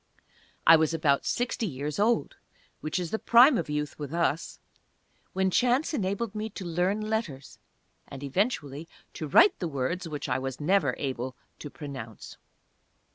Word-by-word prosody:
I 165 - +9
was 160 +1 +1
about 145 -3 +1
sixty 240 -2 -1
years 145 +2 -4
old 230 +3 +1 0.4
(which 155 +3 -3
is 175 -3 -3
the 220 - -1
prime 250 +4 +6
of 165 -8 -2
youth 150 0 -3
with 145 +2 -5
us), 165 -2 -1 0.7
when 190 0 +1
chance 255 - +2
enabled 200 -2 -2
me 215 +1 -4
to 195 - -8
learn 180 +5 0
letters, 215 -11 -4 0.5
and 135 0 -9
eventually 150 - -2 0.2
to 155 - -5
write 365 - +5
the 175 - -2
words 160 +5 -2
which 150 -1 -5
I 125 0 0
was 130 -1 -5
never 150 -4 +2
able 130 -2 -4 0.2
to 145 - -7
pronounce. 135 -8 -9
165 Hz, 155 wpm, -28 LUFS, 140-205 Hz, 0.7 s, I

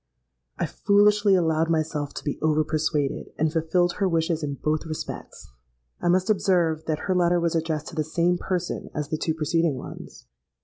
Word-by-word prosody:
I - - 0
foolishly 205 0 +3
allowed 165 -2 +2
myself 155 -3 -1
to - - -6
be 145 - -3
over 155 0 +2
persuaded, 155 -2 -1
and 155 0 +1
fulfilled 170 +2 +1
her 195 -2 +1
wishes 165 -1 0
in 145 -2 -3
both 155 +3 -1
respects. 155 - -7 0.5
I - - -1
must 185 +2 +3
observe 175 -6 +2
that 155 -2 -2
her 190 - +1
letter 175 -1 +3
was 170 -1 0
addressed 160 -2 -2
to - - -11
the 155 - 0
same 170 +3 +1
person 180 -2 -3
as 150 -1 -3
the 155 - -1
two 160 0 -1
preceding 160 -1 +1
ones. - - -10
160 Hz, 180 wpm, -25 LUFS, 155-175 Hz, 0.5 s, foolishly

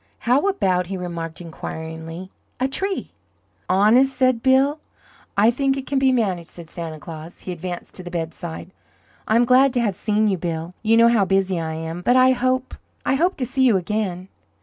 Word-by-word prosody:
"How 255 +10 +3
about," 185 - +1
he 190 +1 -4
remarked, 170 -2 -5
inquiringly, 165 +2 -7 0.3
"a 260 - +2
tree?" 385 +8 -3 0.6
"Honest?" 235 +8 +4
said 255 -3 +2
Bill. 270 +4 +3 0.6
"I 215 +3 +5
think 270 +2 0
it 270 - -5
can 275 0 0
be 265 -1 +4
managed," 190 -9 0
said 170 -2 -10
Santa 165 -2 -6
Claus. 160 +2 -10
He 185 - -6
advanced 175 0 -6
to 185 - -6
the 175 - -7
bedside. 170 +1 -5 0.6
"I'm 230 +2 +4
glad 255 +2 +5
to 245 - +1
have 210 -4 +1
seen 215 +3 +1
you, 190 -3 0
Bill. 165 0 -4
You 225 +1 +3
know 230 0 +7
how 225 -4 +3
busy 190 -1 +1
I 160 -1 -3
am, 165 +2 -5
but 245 +7 +3
I 255 0 +6
hope 255 0 0 0.3
I - - +2
hope 345 +7 +1
to 260 - -1
see 265 +2 0
you 235 -6 +5
again." 185 -1 -3
205 Hz, 190 wpm, -22 LUFS, 175-255 Hz, 0.6 s, know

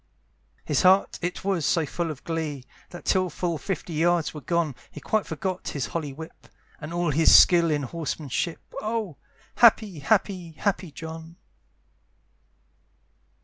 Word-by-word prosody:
His - - +1
heart 190 +1 +4
it 175 +2 -3
was 190 -4 0
so 165 +2 +2
full 170 +3 -3
of 150 -3 -7
glee, 155 -5 -4 0.2
That 175 - -11
till 185 -1 +2
full 170 0 -3
fifty 180 -3 -4
yards 170 +1 +1
were 150 - -8
gone, 170 -3 0 0.2
He - - -10
quite 215 +8 -1
forgot 185 +3 -4
his 140 -4 -2
holly 155 -4 -4
whip, 160 +4 -11 0.3
And 150 +1 -7
all 175 -2 0
his 160 +3 +6
skill 170 -2 +7
in 145 -2 0
horsemanship, 155 +1 -3 0.2
Oh! 215 -7 -3 0.4
happy, 215 -7 +5
happy, 185 0 0
happy 190 +1 -2
John. 160 +2 -9
170 Hz, 145 wpm, -25 LUFS, 155-185 Hz, 0.4 s, skill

